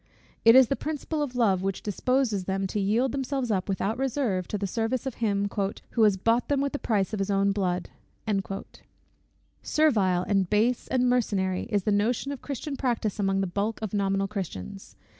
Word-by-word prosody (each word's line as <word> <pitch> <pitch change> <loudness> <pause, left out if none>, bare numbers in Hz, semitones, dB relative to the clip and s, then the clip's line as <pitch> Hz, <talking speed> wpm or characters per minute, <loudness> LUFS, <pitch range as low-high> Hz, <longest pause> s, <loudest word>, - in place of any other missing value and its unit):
It 230 +1 +8
is 260 -2 +8
the 275 - 0
principle 310 +1 -3
of 270 -4 -3
love 200 -7 +2
which 195 0 -3
disposes 220 -1 0
them 195 +1 -1
to 200 +2 -2
yield 225 +6 +1
themselves 270 -3 -2
up 190 -1 -1
without 200 +4 -1
reserve 250 -9 -1
to 210 - -2
the 200 - -2
service 225 +6 -1
of 265 - -3
him, 200 -2 +1 0.4
"who 235 - 0
has 210 -3 +5
bought 230 +5 +1
them 285 -1 +2
with 280 0 -1
the 290 - -2
price 210 -2 0
of 215 - -2
his 195 +1 -1
own 200 0 +2
blood." 185 -3 -1 1.7
Servile, 200 - +2
and 195 -3 +1
base, 225 +4 +1
and 250 -1 +1
mercenary, 200 -7 +1
is 205 -4 +1
the 210 - +1
notion 225 +7 +1
of 280 - -6
Christian 280 +1 -5
practice 235 -6 -1
among 195 -1 +1
the - - +1
bulk 200 +4 -2
of 215 - -4
nominal 195 -1 +1
Christians. 195 - -6
210 Hz, 190 wpm, -27 LUFS, 195-250 Hz, 1.7 s, It